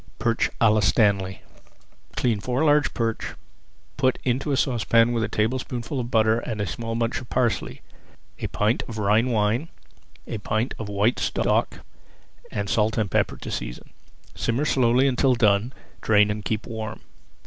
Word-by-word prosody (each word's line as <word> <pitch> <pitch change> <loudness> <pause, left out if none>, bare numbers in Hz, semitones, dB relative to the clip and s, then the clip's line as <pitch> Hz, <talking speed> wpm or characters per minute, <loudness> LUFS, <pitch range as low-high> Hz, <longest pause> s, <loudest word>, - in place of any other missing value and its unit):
PERCH 115 0 +1
À 110 -2 +5
LA 110 - +3
STANLEY 100 -3 +2 0.8
Clean 115 -4 +1
four 125 +7 -1
large 150 -1 +3
perch, 115 -1 -2 0.6
put 130 -2 +2
into 130 +4 0
a 135 - +1
saucepan 115 -3 +3
with 115 -2 0
a - - 0
tablespoonful 125 +3 -2
of 120 -1 -3
butter, 110 -1 +3
a 110 -3 -3
small 115 +6 -4
bunch 115 +2 -1
of 125 - -12
parsley, 120 -7 -1 0.6
a - - -3
pint 105 +3 0
of 115 - -7
Rhine 105 +4 +2
wine, 115 +7 0 0.6
a 110 - -5
pint 110 +5 -1
[Page - - -8
239] 110 - -5
of - - -8
white 100 +4 +1
stock, - - 0 0.6
and 100 -1 -3
salt 110 +2 +1
and 105 -4 0
pepper - - +1
to - - -7
season. - - -6 0.4
Simmer 120 +6 -1
slowly 130 -1 +3
until 130 0 +2
done, 105 +1 +2 0.3
drain, 105 -1 +4
and 105 0 -4
keep 110 0 -2
warm. 110 -3 -6
115 Hz, 165 wpm, -24 LUFS, 105-125 Hz, 0.8 s, À